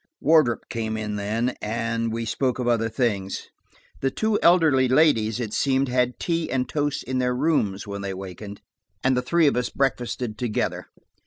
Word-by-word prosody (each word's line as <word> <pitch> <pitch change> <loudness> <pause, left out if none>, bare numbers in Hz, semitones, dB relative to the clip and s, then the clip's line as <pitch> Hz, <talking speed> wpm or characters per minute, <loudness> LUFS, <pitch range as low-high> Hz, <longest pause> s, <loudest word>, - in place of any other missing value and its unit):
Wardrop 155 -7 +3
came 110 -1 -3
in 105 -1 -3
then, 110 +5 -1
and 115 +1 -2
we 115 +1 -3
spoke 125 +2 -1
of 125 -1 -2
other 115 -1 +2
things. 105 -5 -2 0.5
The 135 - +1
two 220 +8 0
elderly 160 -7 +5
ladies 125 -5 +3
it 110 -4 -4
seemed 135 -1 +1
had 125 0 +1
tea 165 -1 -1
and 130 0 0
toast 145 -1 -1
in 130 0 -2
their 125 0 +1
rooms 125 -9 0
when 100 -1 -6
they 100 -1 -4
wakened, 95 +2 -8 0.4
and 130 0 +3
the 125 - +1
three 165 +6 +2
of 145 - +3
us 125 0 0
breakfasted 125 -4 -2
together. 120 -4 -2
125 Hz, 175 wpm, -24 LUFS, 110-135 Hz, 0.5 s, elderly